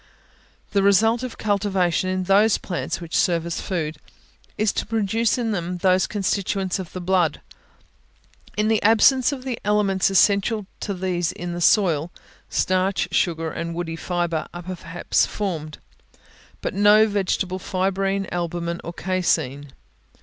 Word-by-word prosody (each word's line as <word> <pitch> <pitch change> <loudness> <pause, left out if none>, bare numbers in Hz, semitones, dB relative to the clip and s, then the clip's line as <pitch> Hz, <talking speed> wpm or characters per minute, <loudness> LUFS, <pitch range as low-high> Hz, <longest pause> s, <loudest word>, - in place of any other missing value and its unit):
The 200 - +2
result 225 +4 +4
of 255 -2 -6
cultivation 195 -4 0
in 185 0 -1
those 200 +3 +4
plants 175 -2 -4
which 170 -2 -6
serve 170 -2 +2
as 170 - -3
food, 160 -5 -3 0.6
is 215 -1 +1
to - - -2
produce 225 +1 +1
in 235 -2 -1
them 180 -2 -3
those 185 +1 +2
constituents 195 -2 -1
of 185 -3 -7
the 185 - -5
blood. 175 -4 +1 1.2
In 210 0 +2
the 220 -1 +2
absence 235 +5 +5
of 265 -3 -6
the 255 -3 -4
elements 205 -2 +2
essential 200 +2 +3
to 200 - -3
these 180 -2 -1
in 175 0 -6
the 175 - -5
soil, 170 -5 +3 0.4
starch, 185 -1 0
sugar 165 -2 0
and 170 0 -4
woody 165 -1 -3
fibre, 175 -1 -2
are 175 0 -8
perhaps 175 -1 -1
formed; 160 -7 -4 0.8
but - - -3
no 205 +2 +6
vegetable 190 -2 -1
fibrine, 195 +1 -1
albumen, 170 0 -3
or 170 - -6
caseine. 160 -6 -1
185 Hz, 140 wpm, -23 LUFS, 175-205 Hz, 1.2 s, no